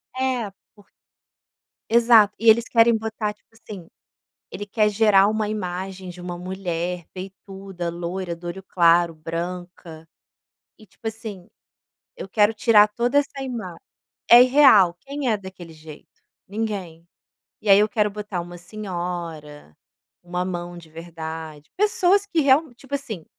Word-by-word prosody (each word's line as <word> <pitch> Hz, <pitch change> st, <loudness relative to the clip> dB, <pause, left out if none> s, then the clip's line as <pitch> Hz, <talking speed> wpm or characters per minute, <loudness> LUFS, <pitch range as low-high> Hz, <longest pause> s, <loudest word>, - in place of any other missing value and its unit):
É, 255 Hz, -5 st, -1 dB, 0.2 s
por 205 Hz, -2 st, -21 dB, 1.0 s
exato. 230 Hz, -3 st, +5 dB
E 230 Hz, -, +4 dB
eles 230 Hz, +1 st, +5 dB
querem 230 Hz, 0 st, +4 dB
botar 220 Hz, -1 st, -4 dB
tipo -, -, -41 dB
assim, 200 Hz, -6 st, -11 dB, 0.6 s
ele 205 Hz, -, -7 dB
quer 210 Hz, +1 st, +2 dB
gerar 205 Hz, -2 st, +4 dB
uma 215 Hz, -1 st, -1 dB
imagem 190 Hz, -2 st, -5 dB
de 180 Hz, -, -11 dB
uma 175 Hz, 0 st, -6 dB
mulher 180 Hz, -1 st, -4 dB
peituda, 190 Hz, -1 st, -8 dB
loira, 175 Hz, +1 st, -4 dB
do 170 Hz, +1 st, -9 dB
olho 190 Hz, +3 st, -7 dB
claro, 170 Hz, -1 st, +3 dB
branca. 165 Hz, 0 st, -7 dB, 0.7 s
E 215 Hz, -, -17 dB
tipo 225 Hz, +4 st, -7 dB
assim, 215 Hz, -5 st, -9 dB, 0.7 s
eu -, -, -7 dB
quero 210 Hz, +2 st, +3 dB
tirar 215 Hz, -1 st, +5 dB
toda 240 Hz, +6 st, +1 dB
essa 275 Hz, -1 st, -5 dB
imagem. 230 Hz, -9 st, -6 dB, 0.5 s
É 240 Hz, +1 st, +10 dB
irreal, 250 Hz, -10 st, +6 dB
quem 280 Hz, -2 st, -3 dB
é 215 Hz, -, +2 dB
daquele 190 Hz, -4 st, -11 dB
jeito? 155 Hz, -1 st, -13 dB, 0.4 s
Ninguém. 195 Hz, -6 st, -5 dB, 0.6 s
E 210 Hz, -, -5 dB
aí 195 Hz, -, +8 dB
eu 210 Hz, +1 st, +3 dB
quero 210 Hz, -2 st, 0 dB
botar 205 Hz, -3 st, -5 dB
uma 175 Hz, +1 st, -9 dB
senhora, 175 Hz, -, -7 dB, 0.5 s
uma 180 Hz, +1 st, -3 dB
mão 175 Hz, -1 st, -5 dB
de 165 Hz, -2 st, -13 dB
verdade, 160 Hz, -2 st, -8 dB
pessoas 405 Hz, -2 st, +2 dB
que 340 Hz, -5 st, 0 dB
real 280 Hz, 0 st, +3 dB
tipo 270 Hz, +3 st, -9 dB
assim, 225 Hz, -, -5 dB
195 Hz, 140 wpm, -23 LUFS, 175-225 Hz, 1.0 s, É